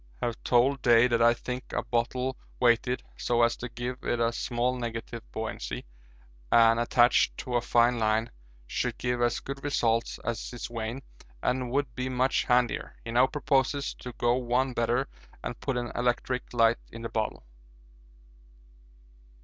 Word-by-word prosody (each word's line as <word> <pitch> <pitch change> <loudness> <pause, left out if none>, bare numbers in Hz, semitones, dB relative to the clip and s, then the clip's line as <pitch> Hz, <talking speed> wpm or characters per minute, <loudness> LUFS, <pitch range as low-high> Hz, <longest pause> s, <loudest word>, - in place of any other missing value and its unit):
Have 115 - -3
told 130 +3 +3
Day 120 0 +6
that 115 -2 +1
I 120 +1 +6
think 125 +1 -6
a - - -1
bottle 125 +2 -1 0.2
weighted 125 +1 +2
so 120 -1 +2
as 115 0 +3
to 125 - -6
give 125 +2 -5
it 120 - 0
a 115 0 +2
small 120 +2 -1
negative 115 -1 -5
buoyancy, 110 0 -5 0.7
and 115 0 +6
attached 120 +1 +3
to 125 - -5
a 120 - +3
fine 120 0 +3
line, 110 +1 +1 0.3
should - - -2
give 125 0 -1
as 120 0 +2
good 135 0 -7
results 115 -5 +1
as 120 -1 -3
his 120 - -6
vane 115 +3 -5 0.4
and 125 0 0
would 140 +1 -1
be 130 0 -3
much 130 +1 +1
handier. 125 -1 +1
He 115 - -4
now 125 +3 +5
proposes 140 -1 0
to 125 - -7
go 120 0 +2
one 125 +1 0
better 120 +3 +1 0.4
and - - -5
put 135 -3 -2
an 120 -1 -3
electric 125 +1 -1
light 115 -1 +3
in 115 0 -8
the 115 - -3
bottle. 110 - -3
120 Hz, 160 wpm, -28 LUFS, 115-125 Hz, 0.7 s, Day